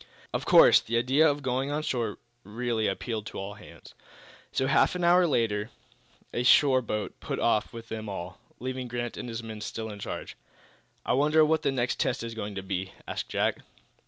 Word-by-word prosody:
Of - - -2
course, - - +8
the 115 +1 -2
idea 135 +6 +4
of 145 0 -2
going 130 +1 -1
on 150 +1 -2
shore 115 -7 -2 0.3
really 115 +1 -1
appealed 110 +2 -3
to - - -8
all 100 +1 -5
hands. 105 +1 -14 0.6
So, 130 - 0
half 140 +6 +3
an 180 - -2
hour 175 +1 +5
later, 115 -6 0 0.6
a - - 0
shore 130 +1 +5
boat 105 -3 -4
put - - -4
off 110 -2 +1
with 115 -1 -10
them 110 -1 -5
all, 90 -2 -6 0.2
leaving 130 0 -4
Grant 120 0 -4
and 125 - -6
his 115 0 -5
men 110 -1 -7
still 110 0 -5
in 105 - -9
charge. - - -6 0.7
"I - - +1
wonder 150 +3 +4
what 160 0 +2
the 145 -3 +1
next 125 -2 -1
test 125 - 0
is 115 0 -5
going 105 -2 -5
to 95 - -4
be?" 95 0 -4
asked - - -4
Jack. - - 0
120 Hz, 195 wpm, -28 LUFS, 105-135 Hz, 0.7 s, course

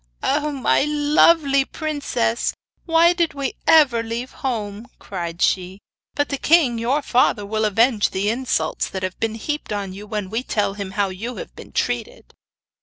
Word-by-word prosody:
'Oh, 295 +2 +1
my 270 -1 +2
lovely 295 -1 +3
princess, 280 - -2 0.3
why 335 +1 +5
did 340 -4 0
we 275 -2 -2
ever 285 -8 +5
leave 230 +3 -5
home?' 220 -3 -4
cried 170 -3 -4
she. 185 0 0 0.4
'But 290 0 0
the 280 - -3
king 295 -8 +3
your 265 +6 0
father 240 -5 +2
will 215 +1 -1
avenge 225 +1 +3
the 195 +2 -2
insults 225 -9 -1
that 190 -1 -5
have 185 0 -4
been 225 -1 -1
heaped 295 +5 -4
on 200 -2 -3
you 205 +2 -10
when 210 -3 -4
we 225 +2 -1
tell 210 -5 -1
him 200 -1 -6
how 200 -1 +2
you 220 +7 -6
have - - -9
been - - -12
treated. - - -3
235 Hz, 170 wpm, -21 LUFS, 205-290 Hz, 0.4 s, why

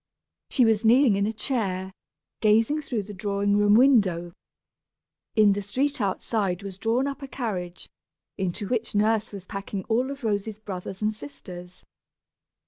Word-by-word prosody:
She 255 - +4
was 220 -1 +2
kneeling 235 0 +5
in 200 +1 +1
a - - 0
chair, 195 -6 -2 0.5
gazing 225 +8 +3
through 240 -7 -3
the 205 +1 -9
drawing 200 0 0
room 205 0 +5
window. 200 -10 +4 1.0
In 215 -2 +6
the 200 +1 0
street 255 +7 -1
outside 195 -1 -1
was 195 -1 -7
drawn 230 +5 +1
up 280 +1 -4
a 275 - -6
carriage, 190 -10 -4 0.5
into 195 +1 -3
which 235 -2 -2
Nurse 215 +1 +2
was 195 -3 -8
packing 195 0 -5
all 240 +5 0
of 280 -1 -7
Rosy's 210 -1 -1
brothers 195 -1 -7
and 215 +1 +1
sisters. 180 +2 -10
210 Hz, 150 wpm, -26 LUFS, 195-230 Hz, 1.0 s, In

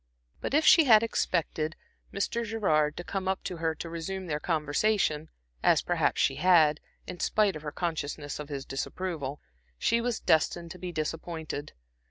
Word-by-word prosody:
But - - -2
if 310 - +3
she 325 - +8
had 220 -4 +7
expected 160 -7 -1 0.4
Mr. 230 +4 -1
Gerard 155 -10 +1
to 175 - -4
come 190 +1 -4
up 190 0 -1
to 180 - -4
her 160 -1 -1
to 170 - -6
resume 170 +3 -5
their 150 -3 -2
conversation, 155 +1 0 0.3
as - - +4
perhaps - - +1
she - - +2
had, 160 -5 +5 0.3
in 180 - -8
spite 210 -4 +2
of 155 - -7
her 150 -1 -5
consciousness 150 -4 -3
of 150 0 -7
his 140 -2 -5
disapproval, 145 0 -4 0.4
she 230 - +2
was 240 -1 -1
destined 165 +2 +1
to 180 - -9
be 180 -1 -5
disappointed. 160 -1 -4
165 Hz, 170 wpm, -29 LUFS, 150-190 Hz, 0.4 s, she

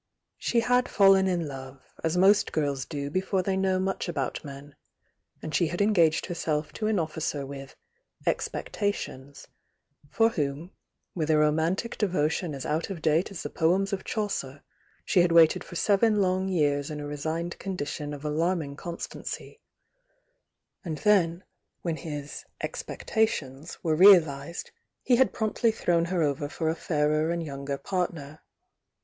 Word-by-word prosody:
She 235 - +1
had 250 +2 +2
fallen 195 -1 +5
in 175 -4 0
love, 135 -1 -9 0.2
as 165 +2 0
m^t 180 -6 +3
S 135 -1 -5
do 145 -2 -5
before 185 +2 0
they 190 +1 0
know 190 -1 +1
much 190 -1 -2
about 140 -7 -3
men, 140 0 -10 0.7
and 155 - -5
she 170 - +3
had 175 +3 -4
engaged 175 -7 +3
herself 160 -4 -2
to 215 - -2
an 215 -1 +1
officer 155 -3 -2
with 135 0 -9 0.5
"expectations" 145 -9 -3 0.6
for 225 +6 +3
whom, 150 -1 -3 0.4
with 160 -3 -2
a 155 - +4
romantic 160 +9 +1
devotion 170 -4 0
as 135 - -6
out 155 +5 -1
of 190 -4 -5
date 160 +3 +2
as 195 -5 -7
the - - -5
poems 190 +5 +1
of 190 - -2
Chaucer, 150 -11 -3 0.4
she 190 - +3
had 175 -1 +2
waited 165 -1 +5
for 175 - -11
seven 210 +3 +3
lone 190 0 +1
years 145 -5 +1
in 150 -1 -5
a 145 - -5
resigned 160 +4 -4
condition 150 -5 -4
of 145 0 -7
alarming 155 -1 -1
constancy 170 +3 -7 1.2
and 160 -5 -4
then, 185 -4 +2 0.4
when 165 -2 -1
his 145 -4 -6 0.2
"expectations" 160 - -2
were 160 -2 +2
realised 170 -4 +5 0.3
he 245 - +4
had 260 - +4
promptly 220 +1 0
thrown 170 -5 +1
her 175 -1 0
over 145 0 -1
for 160 0 -2
a 160 - 0
fairer 155 -1 +1
and 170 0 -1
^o^u 140 -3 -7
P.^"®"" 155 0 -3
165 Hz, 150 wpm, -27 LUFS, 150-190 Hz, 1.2 s, fallen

